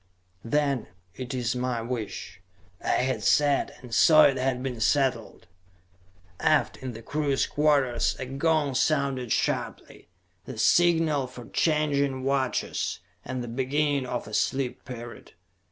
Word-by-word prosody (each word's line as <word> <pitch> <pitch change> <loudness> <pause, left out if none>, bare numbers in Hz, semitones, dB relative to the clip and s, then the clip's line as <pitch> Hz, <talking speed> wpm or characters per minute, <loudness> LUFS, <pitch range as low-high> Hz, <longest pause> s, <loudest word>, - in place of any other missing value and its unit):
"Then 140 0 0 0.3
it 130 0 -6
is 125 -1 -1
my 125 -1 -1
wish," 115 -7 -6 0.4
I - - -6 0.2
had 130 0 -1
said, 145 -1 +2
and 120 -2 -10
so 155 +6 +7
it 140 -3 +4
had 130 -1 -1
been 125 -3 -4
settled. 135 +2 0 0.9
Aft, - - +2
in 130 -2 -6
the 115 +1 -10
crew's 145 0 0
quarters, 140 -5 +1
a 130 - -5
gong 145 +2 0
sounded 130 -3 0
sharply: - - -2 0.4
the 130 - -8
signal 160 0 +3
for 125 -2 -11
changing 140 -4 +1
watches, 135 -1 -1 0.3
and 130 -1 -4
the - - -6
beginning 135 +3 0
of 120 -3 -4
a 105 - -10
sleep 130 +2 -1
period. 120 -2 -9
130 Hz, 135 wpm, -26 LUFS, 125-145 Hz, 0.9 s, so